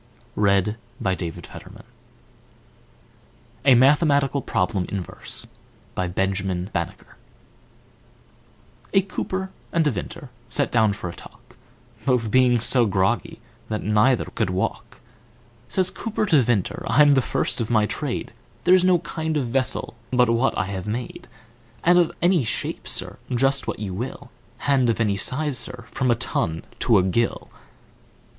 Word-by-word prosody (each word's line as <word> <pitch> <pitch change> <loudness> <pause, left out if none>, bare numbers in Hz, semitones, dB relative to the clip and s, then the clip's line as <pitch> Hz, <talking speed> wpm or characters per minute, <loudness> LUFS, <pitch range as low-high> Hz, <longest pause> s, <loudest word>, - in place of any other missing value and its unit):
Q - - -4
R. - - +5
S 100 -1 +4
T. 105 - -2
U 110 - -9 0.2
V. 95 - 0
W 85 -3 -4
X. - - -10
Y - - -9
Z - - -14 1.9
A 135 -3 +7
Mathematical 140 +1 +4
Problem 95 -4 -1
in 100 -2 -3
Verse - - -6 0.5
A 90 - -1 3.0
COOPER 190 0 -3 0.2
and 165 -2 +2
Vintner 140 - -3 0.2
sat - - 0
down 110 -3 +3
for 95 - -6
a 85 - -6
talk, - - -16 0.5
Both 120 -5 +2
being 125 -2 +4
so 120 +1 +4
groggy, 95 -1 0 0.3
that 110 -1 -2
neither 110 +4 +3
could - - -2
walk, 115 +6 -3 0.7
Says 185 +9 +1
Cooper 220 -1 -2
to 155 -8 +4
Vintner, 115 -5 0
"I'm 145 +5 +6
the 135 - +4
first 120 - -1
of 110 - -3
my 110 -3 +3
trade, - - -4 0.3
There's 185 0 +5
no 185 -1 +5
kind 160 -2 -3
of 130 -5 -1
vessel, 130 +1 0 0.2
but 125 -2 +3
what 120 +3 +1
I - - +1
have 95 0 -5
made, 120 +3 -5 0.6
And 175 +1 +5
of 170 - +3
any 175 -4 +4
shpe, 115 - -3
Sir, - - -3
just 135 +2 +1
what - - -2
you 100 -3 -5
will, 125 +5 -6 0.3
And 135 -4 +3
of 115 - 0
any 105 -3 +2
size, 135 +5 0
Sir, 125 -2 -5
from 130 -2 0
a 120 - +4
ton 80 -8 -1 0.2
to 115 - +4
a 95 - +4
gill!" 115 +6 -1
125 Hz, 150 wpm, -23 LUFS, 105-140 Hz, 3.0 s, A